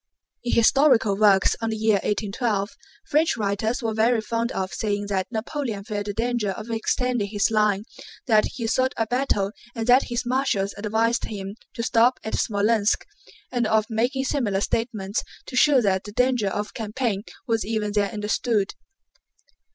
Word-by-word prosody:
In 240 - -1
historical 230 -3 +4
works 200 -2 +4
on 225 - -1
the 220 - -2
year 215 -1 +3
1812 205 +1 -1 0.3
French 310 +2 +2
writers 220 +4 -1
are 225 -1 -1
very 225 +2 +3
fond 230 +2 -2
of 190 -1 -3
saying 205 0 -1
that 190 +2 -1
Napoleon 225 -2 -3
felt 205 0 -4
the 205 - -2
danger 235 -2 0
of 215 +4 -5
extending 230 0 0
his 205 +1 0
line, 210 -2 +2 0.4
that 215 -4 +4
he 235 - -4
sought 255 +3 +1
a 225 - +1
battle 220 -5 0 0.2
and 225 -1 -2
that 250 +3 +5
his 240 +1 -3
marshals 245 -6 0
advised 225 +3 0
him 195 -1 -6 0.2
to 230 - -3
stop 245 +1 +3
at 220 - -5
Smolénsk, 210 0 +1 0.5
and 240 -3 0
of 215 0 +2
making 245 +5 0
similar 225 -9 0
statements 215 -3 -1 0.2
to - - -8
show 270 +1 +5
that 190 -3 +1
the 205 - -8
danger 250 -1 +1
of 205 +2 -3
the - - -19
campaign 220 -2 -2 0.2
was 225 -3 0
even 215 -1 -2
then 205 -1 +1
understood. 210 0 -1
220 Hz, 165 wpm, -24 LUFS, 205-240 Hz, 0.5 s, that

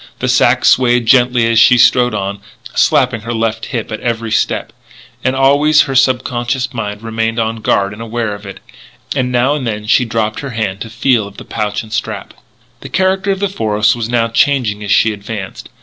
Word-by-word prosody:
The - - -3
sack - - +3
swayed 120 -2 +3
gently 125 0 +3
as 115 -1 +3
she 125 - +6
strode 125 -1 +4
on, 100 0 -3 0.3
slapping 125 -3 +2
her 115 +2 -4
left 115 0 -2
hip 115 -4 -4
at 110 - -4
every 115 -2 -3
step; - - -1 0.5
and 130 +1 0
always 145 +3 +4
her 135 - -4
subconscious 125 0 0
mind 105 -2 -5
remained 115 0 -2
on 115 0 -1
guard 100 -2 0
and 105 - -10
aware 115 -1 -3
of 100 0 -9
it; 95 - -10 0.5
and 125 -2 -1
now 125 +3 +2
and 140 -5 -3
then 105 -1 -4
she 115 +3 +3
dropped 110 -2 -2
her 140 - -6
hand 100 -3 -2
to 115 - -6
feel 115 -1 +1
of 100 0 -15
the - - -10
pouch 105 -1 -3
and 110 -1 -11
strap. 110 - -4 0.5
The - - -10
character 190 +1 0
of 195 -1 0
the 200 - +1
forest 105 - +1
was 115 -1 -4
now 120 -1 +1
changing 115 -4 +1
as 105 - -6
she 110 - +3
advanced. 100 -1 -7
115 Hz, 200 wpm, -15 LUFS, 110-125 Hz, 0.5 s, she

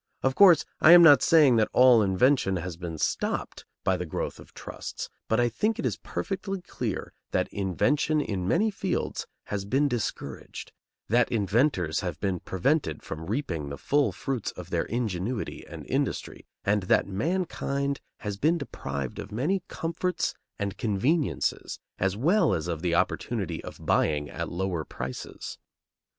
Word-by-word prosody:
Of 130 - +2
course, 175 -2 +7
I 165 - +8
am 175 -1 +10
not 145 -5 +8
saying 150 -8 +6
that 110 - +3
all 125 -3 +7
invention 100 +1 +3
has 90 -1 -4
been 85 -1 -6
stopped - - -2 0.2
by 95 -1 +2
the 90 - -4
growth - - -4
of - - -14
trusts, - - -7 0.2
but 110 - +2
I 120 - +4
think 215 - 0
it - - -3
is 110 -6 0
perfectly 195 - -4
clear 120 - -4 0.2
that - - 0
invention 130 - +1
in 95 -10 -2
many 215 - +2
fields 190 -2 -2 0.2
has 100 -1 -3
been 135 +8 +2
discouraged, 110 - -4 0.4
that 120 +3 +3
inventors 100 - +1
have 90 -4 -4
been 95 -3 -1
prevented 135 - 0
from 80 +1 -6
reaping 95 - -2
the 70 - -6
full 145 - +2
fruits 130 -6 -3
of - - -10
their - - 0
ingenuity 110 -1 -3
and - - -9
industry, - - -2 0.2
and 105 +1 +2
that - - +4
mankind 140 - -1 0.2
has 105 -2 -4
been 160 +10 +2
deprived 70 - -5
of - - -7
many 155 - 0
comforts 170 +2 -2 0.2
and 100 -1 -4
conveniences, 130 - 0 0.2
as 95 +1 0
well 165 - +3
as 80 0 -3
of 85 -2 -3
the 85 -1 +1
opportunity - - -1
of - - -10
buying 75 -1 +1
at - - -4
lower 90 -2 -2
prices. 65 -3 -7
110 Hz, 160 wpm, -27 LUFS, 90-145 Hz, 0.4 s, am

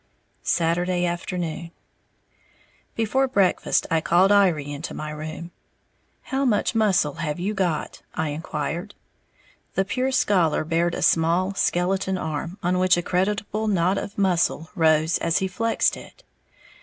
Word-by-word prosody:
Saturday 175 +1 +1
Afternoon. 175 -1 -3 1.3
Before 245 +5 +1
breakfast 200 -8 +2
I 165 -1 +2
called 180 +5 +4
Iry 175 -8 +3
into 145 +2 -6
my 155 0 -5
room. 155 +3 -7 0.7
"How 270 0 -2
much 235 -6 +1
muscle 200 -10 +2
have 150 0 -3
you 195 +4 -1
got?" 180 -6 -2
I 160 -1 -1
inquired. 160 +5 -4 0.8
The 195 - +1
"pure 255 +6 -1
scholar" 180 -12 +2
bared 170 +2 0
a - - -3
small, 170 +4 +2
skeleton 190 +1 0
arm, 160 +2 -4
on 180 +1 +1
which 185 -1 +4
a 175 - -1
creditable 205 +4 -1
knot 190 -1 +2
of 200 - -7
muscle 175 -4 +1
rose 160 0 +2
as 165 +1 +1
he 190 - 0
flexed 225 +5 0
it. - - -14
180 Hz, 135 wpm, -24 LUFS, 165-195 Hz, 1.3 s, called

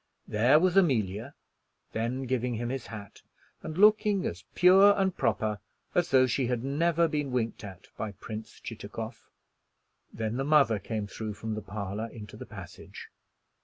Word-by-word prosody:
There 120 +7 +4
was 180 +1 +2
Amelia, 120 - +1 0.6
then 120 +4 -2
giving 125 -1 -1
him 120 +1 -3
his 130 -1 -4
hat, 105 -3 -10 0.4
and 155 - -6
looking 210 -1 +4
as 90 +2 -5
pure 195 +3 +7
and 190 -2 +1
proper 105 -1 0 0.3
as 175 -1 +2
though 130 -1 +5
she 130 0 0
had 125 -1 -1
never 165 +5 +2
been 150 -3 -2
winked 115 -3 -2
at 95 -3 -10
by 110 -2 -4
Prince 110 +2 -8
Chitakov. - - -7 0.8
Then 110 +1 -3
the 135 - 0
mother 140 -7 +4
came 110 +1 -3
through 105 +1 -6
from 110 +1 -4
the 110 - -4
parlor 100 +2 -4
into 105 -3 -10
the - - -9
passage. - - -10
120 Hz, 160 wpm, -29 LUFS, 110-150 Hz, 0.8 s, pure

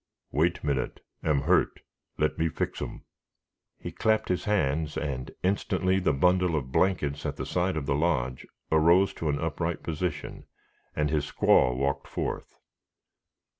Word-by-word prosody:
"Wait 85 +5 +1
minute; 70 -3 -1 0.2
am 75 -3 +2
hurt; - - +2 0.4
let 75 +1 0
me 80 0 +2
fix - - -3
'em." - - -6 0.7
He - - -7
clapped 110 0 +1
his 90 - 0
hands, 80 -7 0
and 65 -4 -3
instantly 95 0 +1
the 95 - +2
bundle 90 +4 +3
of 65 -4 -3
blankets 75 -5 +1
at - - -2
the - - -4
side 90 -1 0
of 75 - -2
the 70 - +1
lodge 70 -5 0 0.2
arose 85 +5 +5
to 80 - -3
an 70 - +1
upright 80 +1 -2
position, 85 +2 -4 0.5
and 75 -1 0
his 75 -2 -1
squaw 60 -1 +4
walked 70 +1 -1
forth. - - -4
80 Hz, 150 wpm, -28 LUFS, 70-90 Hz, 0.7 s, arose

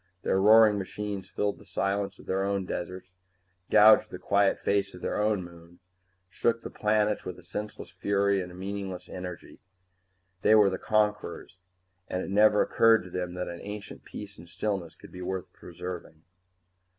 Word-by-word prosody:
Their 95 - +2
roaring 105 0 +7
machines 100 0 -5
filled 100 0 -2
the - - -14
silence 100 +1 -1
of - - -15
their 95 +1 0
own 100 -1 -1
deserts, 90 +1 -5 0.6
gouged 110 +1 +7
the - - -7
quiet 100 -1 +2
face 100 -1 0
of 90 - -12
their - - -1
own 105 -3 +1
moon, 85 0 -14 0.5
shook 115 +5 0
the - - -7
planets 105 0 +1
with 90 -1 -6
a 90 - -15
senseless 105 +4 -6
fury 100 -1 +1
of 90 - -6
meaningless 95 0 -6
energy. 90 -1 -8 0.8
They 110 - +5
were 105 -2 +6
the 95 - -3
conquerors, 105 -3 -1 0.5
and 90 - -2
it - - -6
never 105 +1 +5
occurred 115 -2 +4
to 90 - -11
them 90 0 -4
that 90 0 -3
an 85 0 -6
ancient 105 0 -8
peace 105 -3 -9
and 85 +1 -13
stillness 90 -2 -3
could - - -15
be 90 - -9
worth 95 -1 -4
preserving. 85 -2 -8
100 Hz, 170 wpm, -28 LUFS, 90-105 Hz, 0.8 s, roaring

